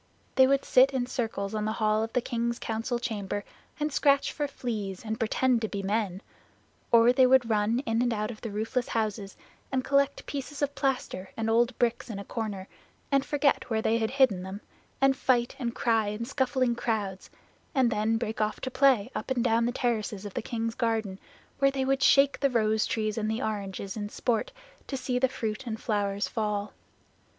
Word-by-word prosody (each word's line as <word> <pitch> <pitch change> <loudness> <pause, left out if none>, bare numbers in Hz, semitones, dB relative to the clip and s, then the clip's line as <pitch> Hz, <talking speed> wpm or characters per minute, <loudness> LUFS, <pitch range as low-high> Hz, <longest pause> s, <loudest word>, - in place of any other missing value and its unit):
They 260 0 +6
would 275 0 +2
sit 265 +2 +5
in 250 -2 +1
circles 220 -5 -3
on 215 -1 -1
the 215 - -1
hall 215 -1 +1
of 225 +1 -3
the 250 - +2
king's 235 0 -1
council 225 +2 -2
chamber, 205 -4 -3 0.4
and 300 -1 -1
scratch 280 -1 +3
for 295 -2 -1
fleas 215 -8 -5
and 220 0 -3
pretend 240 +2 +2
to 220 - 0
be 200 -1 -4
men; 200 -1 -1 0.7
or 235 +1 +6
they 255 0 +5
would 255 -2 +5
run 215 +3 +2
in 225 0 +1
and 245 0 +1
out 215 0 -2
of 215 - -11
the 225 - -4
roofless 220 +4 -2
houses 210 -3 -2 0.3
and 260 -1 0
collect 280 0 +1
pieces 285 +1 -5
of 285 0 0
plaster 255 -10 -2
and 225 0 0
old 235 +2 +2
bricks 240 0 0
in 215 - -5
a 200 - -7
corner, 205 -5 -4 0.4
and 275 -1 +3
forget 290 -3 +1
where 220 -1 0
they 230 +1 +2
had 220 -1 0
hidden 260 -9 +3
them, 190 +3 -7 0.4
and 270 0 +4
fight 245 -2 +1
and 235 -3 -3
cry 225 -3 +2
in 210 +3 -3
scuffling 260 -1 +1
crowds, 210 -5 -3 0.5
and 255 -3 +3
then 220 +1 +1
break 220 -1 -3
off 215 0 -1
to 260 - -3
play 260 -7 +3
up - - -5
and 250 -3 +1
down 230 -1 +2
the - - 0
terraces 220 -5 -2
of 205 - -7
the - - -2
king's 230 -1 -3
garden, 220 -5 -1 0.4
where 275 0 +5
they 270 -1 -1
would 270 0 +1
shake 275 +1 +5
the 275 - +3
rose 220 -3 +2
trees 215 0 -1
and 215 0 -1
the 220 +3 -2
oranges 200 -2 -4
in 205 -1 -4
sport 240 - -1 0.4
to 270 - -3
see 250 -1 -1
the 260 0 +3
fruit 225 0 -4
and 220 -1 -3
flowers 205 -2 -1
fall. 210 -2 -2
230 Hz, 200 wpm, -28 LUFS, 215-255 Hz, 0.7 s, They